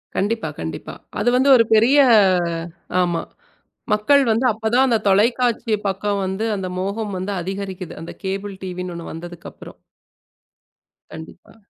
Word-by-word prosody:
கண்டிப்பா, 205 -4 -1
கண்டிப்பா 80 0 -6 0.3
அது 215 +4 +2
வந்து 275 +2 +3
ஒரு 230 - +5
பெரிய 230 +6 +5 1.0
ஆமா. 175 -2 0 0.7
மக்கள் 280 +7 +4
வந்து 230 +4 +1
அப்பத் 220 +1 -3
தான் 265 +2 +5
அந்தத் 225 -4 0
தொலைக்காட்சி 230 +2 +2
பக்கம் 200 +1 -1
வந்து 190 +4 -2
அந்த 190 -2 -4
மோகம் 200 +2 -3
வந்து 195 +2 -3
அதிகரிக்குது. 190 0 -6
அந்தக் 165 - -10
கேபுல் 195 +1 -4
டிவி 180 -1 -5
ஒண்ணு 170 -1 -7
வந்ததுக்கு 170 +1 -9
அப்புறம். - - -13 1.3
கண்டிப்பா. 160 +6 -12
200 Hz, 135 wpm, -21 LUFS, 180-225 Hz, 1.3 s, ஒரு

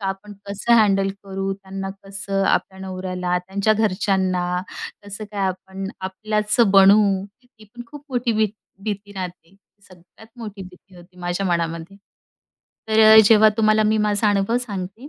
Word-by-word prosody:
का 195 - -4
आपण 195 +2 -5
कसं 200 +4 -1
हँडल 195 -3 +3 0.2
करू, 195 0 -3
त्यांना 195 0 -7 0.2
कसं 195 0 -3
आपल्या 190 0 0
नवऱ्याला, 185 -1 -3
त्यांच्या 195 +4 0
घरच्यांना 185 -4 0 0.4
कसं 205 +1 -8
काय 205 -2 -3
आपण 190 +1 -5
आपल्याच 210 +3 -2 0.2
बनू, 195 +2 +7 0.2
ती 225 +1 -23
पण 240 +4 -11
खूप 290 +3 -12
मोठी 245 -2 -1
भी 220 0 +2 0.4
भीती 205 -1 -5
राहते. 180 -2 -8 0.3
सगळ्यात 185 +4 -18
मोठी 210 -4 -8
भीती 185 +1 -16
होती 175 +1 -17
माझ्या 175 +2 -2
मनामध्ये. 170 +1 -2 0.9
तर 220 0 +3
अ, 220 0 +8
जेव्हा 215 0 +6
तुम्हाला 215 -1 +3
मी 215 +1 +2
माझा 210 +1 +1
अनुभव 205 +4 +1
सांगते 205 +2 -7
195 Hz, 145 wpm, -21 LUFS, 190-215 Hz, 0.9 s, अ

